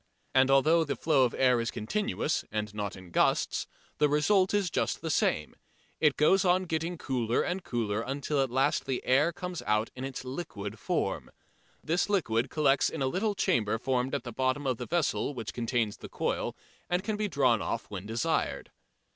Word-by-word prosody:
And 130 0 +5
although 155 +5 +5
the 145 -3 -2
flow 145 -5 +3
of 120 - -2
air 125 -2 +3
is 115 - -2
continuous, 205 - -1
and 105 -1 -3
not 105 -1 -4
in 95 -2 -13
gusts, - - +1 0.3
the 150 0 +4
result 185 +6 +3
is 200 -5 +1
just - - -1
the 160 - -2
same: 75 - 0 0.4
it 150 -3 +3
goes 190 +6 +4
on 185 0 +3
getting 165 0 -2
cooler 120 -5 0
and 180 +1 -3
cooler 115 -5 -1
until 140 +3 -1
at 135 - 0
last 130 +3 +1
the 130 -2 -2
air 145 +6 +4
comes 180 0 -5
out 105 +1 +1
in 130 - -6
its 135 -1 -5
liquid 110 - -6
form. - - -2 0.5
This 175 +5 0
liquid 120 - +1
collects 140 -3 +3
in 150 - -3
a - - +2
little 200 +10 0
chamber 110 - +1
formed 130 +2 -1
at 140 - -3
the 120 - -7
bottom 130 +4 0
of 130 -3 0
the - - -6
vessel 155 -3 0
which 115 -3 -5
contains 115 -3 -1
the - - -10
coil - - -2 0.3
and 180 +1 0
can 215 0 -1
be 210 0 -1
drawn 130 - +2
off - - -3
when 100 0 -6
desired. 115 +1 -1
135 Hz, 190 wpm, -29 LUFS, 115-165 Hz, 0.5 s, And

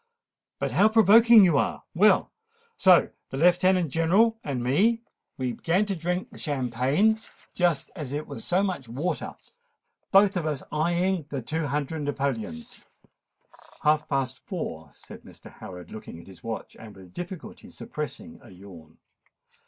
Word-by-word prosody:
"But - - -2
how 210 - +4
provoking 225 0 +7
you 165 -6 +3
are! - - -2
Well, 200 +3 +4 0.4
so 185 -2 +5 0.2
the 135 - -5
Lieutenant 180 0 +3
General 200 - +3
and 130 -4 -3
me, 210 - +2 0.3
we 130 -2 -2
began 175 - 0
to 200 -2 -2
drink 180 +7 -3
the 210 - -12
champagne 140 - +1 0.3
just 175 -5 0
as 150 -7 -6
if 145 +1 -2
it - - -15
was - - -8
so 185 0 +1
much 180 - -3
water—both 195 - -2
of 160 -3 -2
us 150 -3 -3
eyeing 175 +1 0
the 135 -4 -4
two 160 +4 -2
hundred 150 +2 -3
napoleons——" 135 - -4 1.0
"Half 150 0 +2
past 130 -2 -1
four," 80 - -6
said - - -13
Mr. - - -15
Howard, 90 -2 -10
looking 105 -6 -9
at - - -14
his 95 -3 -15
watch, 115 -1 -6
and 110 -2 -12
with 95 -2 -15
difficulty 180 -1 -8
suppressing 220 +10 -7
a - - -16
yawn. 90 -5 -14
160 Hz, 150 wpm, -26 LUFS, 130-190 Hz, 1.0 s, provoking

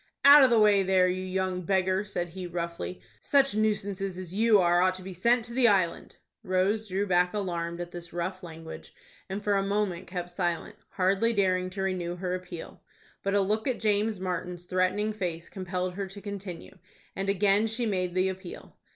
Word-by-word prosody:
"Out 285 0 +10
of 260 - +6
the 235 - +4
way 210 -2 +5
there, 185 -1 +3
you 185 +1 -1
young 185 0 -2
beggar!" 190 +1 +1
said 175 -4 -3
he, 180 +1 -7
roughly. 170 +1 -5 0.2
"Such 275 -3 +3
nuisances 200 -3 -1
as 185 -2 -7
you 215 0 +4
are 175 -1 +4
ought 185 0 +3
to 185 - -8
be 190 0 -7
sent 235 +6 +2
to 235 - -6
the 250 -1 +4
Island." 185 -5 +1 0.3
Rose 195 +4 0
drew 195 +1 -1
back 180 0 +2
alarmed 170 -4 -3
at 175 0 -5
this 175 -1 -8
rough 180 +2 -4
language, 165 -2 -10 0.3
and 195 +2 -4
for 205 - +1
a 195 - +2
moment 195 -3 -1
kept 175 -1 -5
silent, 175 -1 -2
hardly 195 +5 +1
daring 185 -3 +1
to 190 +1 -4
renew 180 -2 -2
her 180 0 -3
appeal. 180 -2 -7 0.4
But 195 0 -1
a 200 - +4
look 215 +4 0
at 255 - -1
James 210 -1 +1
Martin's 180 -1 -4
threatening 185 +4 0
face 175 -5 -4
compelled 185 -1 -3
her 195 +1 -4
to 195 +2 -10
continue, 200 -3 -8 0.4
and 195 +1 -2
again 200 +2 +3
she 230 +2 -2
made 185 -4 -1
the 185 +1 +2
appeal. 190 -1 -9
185 Hz, 195 wpm, -28 LUFS, 180-205 Hz, 0.4 s, Out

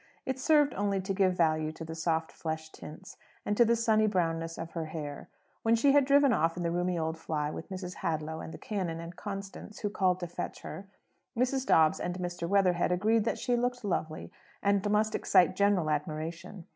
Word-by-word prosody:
It 265 0 -2
served 295 0 +4
only 200 0 0
to 190 +1 -2
give 185 -2 +2
value 155 -2 +2
to 165 - -8
the 160 - -6
soft 160 0 -1
flesh 160 -1 -5
tints, 185 +6 -11 0.3
and 205 - 0
to 240 - +6
the 235 0 +3
sunny 220 -2 +3
brownness 165 -4 -1
of 165 0 -6
her 165 -2 -3
hair. 150 -2 -6 0.3
When 225 0 +3
she 275 +5 +4
had 285 -1 +5
driven 280 -1 +5
off 165 -2 +1
in 175 - -2
the 170 - 0
roomy 175 +1 0
old 160 0 -2
fly 150 -2 -2
with 160 - -8
Mrs. 185 -1 -6
Hadlow 160 -1 -2
and - - -7
the - - -8
canon 180 -6 -3
and 170 +1 -8
Constance, 200 +1 -7
who 205 - -1
called 185 -3 +1
to 175 - -3
fetch 170 - -6
her, 195 - -8 0.5
Mrs. 260 +2 0
Dobbs 160 -1 +4
and 175 0 -3
Mr. 175 -1 -4
Weatherhead 185 -3 +3
agreed 215 +4 +2
that - - 0
she 245 0 0
looked 245 -1 -1
lovely, 160 -5 -3 0.3
and 200 0 +2
must 215 +1 +2
excite 185 -4 +3
general 200 -5 +2
admiration. 160 +4 -4
180 Hz, 205 wpm, -30 LUFS, 165-210 Hz, 0.5 s, to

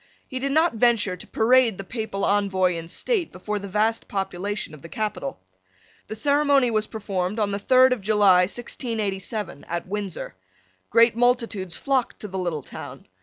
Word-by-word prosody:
He 260 - -4
did 275 +1 -1
not 315 +2 +3
venture 225 -5 +2
to - - -11
parade 235 -2 +3
the 195 - -5
Papal 215 -1 -3
Envoy 190 -3 +2
in 165 0 -6
state 380 - -1
before 210 +3 -4
the 200 - -7
vast 215 +3 0
population 195 -1 -3
of 150 - -12
the 165 - -11
capital. 175 - -4 0.7
The 220 - -5
ceremony 280 0 +3
was 215 -1 0
performed, 200 -2 -3
on 210 -2 +1
the 200 - -2
third 255 +4 +5
of 245 - -5
July 200 -2 +5
1687, 210 - -3
at 170 0 -4
Windsor. 200 -1 -4 0.6
Great 230 0 +5
multitudes 230 -7 +1
flocked 270 -3 -1
to 210 - -4
the 190 -1 -5
little 170 -6 -2
town. - - -9
210 Hz, 170 wpm, -24 LUFS, 190-240 Hz, 0.7 s, third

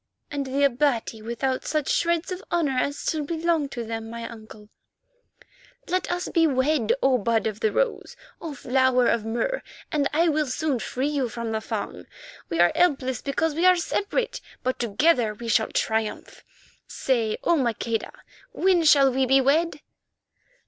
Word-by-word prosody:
"And 280 -2 -3
the 275 +2 0
Abati 250 -5 +1
without 235 +4 -2
such 305 -3 -1
shreds 340 +1 +1
of 365 +1 -5
honour 315 -6 +1
as 285 +3 -1
still 310 -2 -2
belong 325 -1 0
to 240 -3 -5
them, 225 0 -5
my 230 0 -6
uncle." 220 -2 -12 1.2
"Let 365 0 -1
us 355 +1 -2
be 330 -2 +3
wed, 260 -3 +1
O 260 -2 +4
Bud 225 +1 +1
of 215 -1 -3
the 220 - +1
Rose, - - -1 0.3
O 315 -3 -6
Flower 255 -1 +2
of 230 -2 +1
Mur, 240 - -1 0.3
and 290 -4 +1
soon 300 - -1
I 340 - +4
will 300 -2 0
free 260 +4 -2
you 275 -5 -1
from 235 0 -4
the 220 0 -2
Fung. 200 - -5 0.4
We 165 - -2
are 175 0 +5
helpless 270 -8 +1
because 295 +3 -1
we 335 +4 +3
are 365 - +7
separate, 405 +7 -2 0.2
but 255 +1 -1
together 235 0 +2
we 235 +2 -8
shall 220 0 +2
triumph. 220 -1 -2 0.4
Say, 230 -5 -1
O 340 - +3
Maqueda, 235 -4 -1 0.4
when 370 -6 +3
shall 275 -4 +5
we 260 0 +1
be 270 +2 +5
wed?" 295 +3 +1
265 Hz, 165 wpm, -25 LUFS, 230-315 Hz, 1.2 s, are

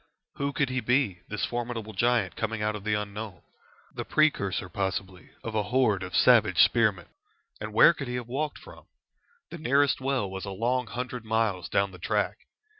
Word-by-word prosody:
Who 140 0 -1
could 140 -1 0
he 130 - 0
be, 125 -5 +1
this 105 - -2
formidable 120 -2 -4
giant 115 -2 +1
coming 110 -1 -2
out 105 0 0
of 105 - -7
the 105 0 +1
unknown? 105 -2 -5 0.5
The - - -4
precursor 100 -12 +1
possibly 95 -2 -4
of 115 - -5
a 110 - +1
horde 105 -2 +1
of 90 -2 -5
savage - - +5
spearmen. 105 -7 +3 0.5
And 110 +1 -5
where 115 +10 +7
could 135 -5 -6
he 125 - -3
have 120 -2 -4
walked 145 +4 -2
from? - - -14 0.6
The 170 - -7
nearest 140 -1 +2
well 130 -6 0
was 95 0 -6
a 100 - -5
long 120 +5 -1
hundred 125 0 -5
miles 110 -6 0
down 100 +2 +1
the 90 - -12
track. - - -1
110 Hz, 185 wpm, -27 LUFS, 100-125 Hz, 0.6 s, where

